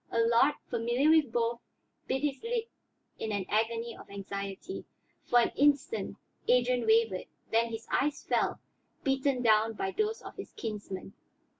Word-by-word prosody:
Allard, 230 +5 +4
familiar 240 +6 +2
with 310 -6 +4
both, 235 0 0 0.5
bit 265 +2 -1
his 285 -2 -1
lip 465 0 -1 0.5
in 220 - -2
an 200 -2 -1
agony 230 +2 0
of - - -13
anxiety. 200 - -5 0.4
For 245 - +4
an - - +1
instant 290 - +2 0.3
Adrian 245 -1 +3
wavered, 220 -4 +3 0.3
then 230 +1 +3
his 225 0 -6
eyes 290 +1 +1
fell, - - +1 0.4
beaten 270 -1 +1
down 220 0 +4
by 190 -3 -2
those 430 - -1
of - - -10
his - - -8
kinsman. 205 -3 -6
235 Hz, 145 wpm, -30 LUFS, 220-280 Hz, 0.5 s, Allard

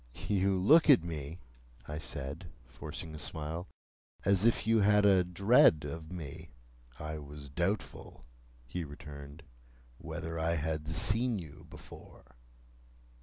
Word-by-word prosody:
"You 100 -1 +2
look 155 - +6
at 130 - +7
me," 80 0 -6 0.5
I 75 +1 -5
said, 75 +4 -6 0.2
forcing 80 +5 -7
a 75 - -8
smile, 80 +4 -5 0.6
"as 100 +3 +4
if 115 - +1
you 115 0 +4
had 105 0 +4
a 95 -2 +5
dread 90 -3 +4
of 80 +2 -7
me." 80 -6 -8 0.5
"I 75 0 -5
was 70 -1 -10
doubtful," 85 - -3 0.4
he 85 +8 -4
returned, 75 -1 -10 0.6
"whether 80 0 -5
I 85 +1 +1
had 80 0 -3
seen 110 +9 +2
you 80 -6 -10
before." 65 - -14
80 Hz, 125 wpm, -32 LUFS, 75-95 Hz, 0.6 s, at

